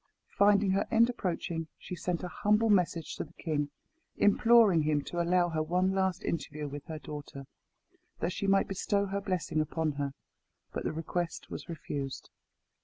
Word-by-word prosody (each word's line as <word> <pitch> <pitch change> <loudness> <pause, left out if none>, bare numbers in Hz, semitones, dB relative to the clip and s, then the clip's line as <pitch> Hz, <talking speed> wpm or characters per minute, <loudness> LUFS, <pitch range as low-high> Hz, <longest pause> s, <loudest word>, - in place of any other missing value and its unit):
Finding 200 -1 +5
her 195 +1 +1
end 230 +1 +4
approaching, 170 -6 -3
she 180 - -7
sent 175 0 -2
a - - -2
humble 210 +4 +2
message 175 -4 +1
to - - -2
the 165 - -15
king, 150 -4 -2 0.5
imploring 210 -4 +5
him 150 -1 +1
to 175 - -2
allow 175 +1 +3
her 160 -2 -1
one 180 +4 +1
last 190 -1 0
interview 150 -1 -3
with 145 0 -7
her 160 -2 -5
daughter, 145 -2 -8 0.7
that 170 +2 -1
she 200 - -2
might 195 0 +4
bestow 200 +1 0
her 200 0 -2
blessing 180 -5 -1
upon 160 0 -1
her; 140 -1 -3 0.6
but - - -3
the - - 0
request 165 +2 -3
was - - -7
refused. 140 -4 -5
175 Hz, 170 wpm, -31 LUFS, 155-195 Hz, 0.7 s, Finding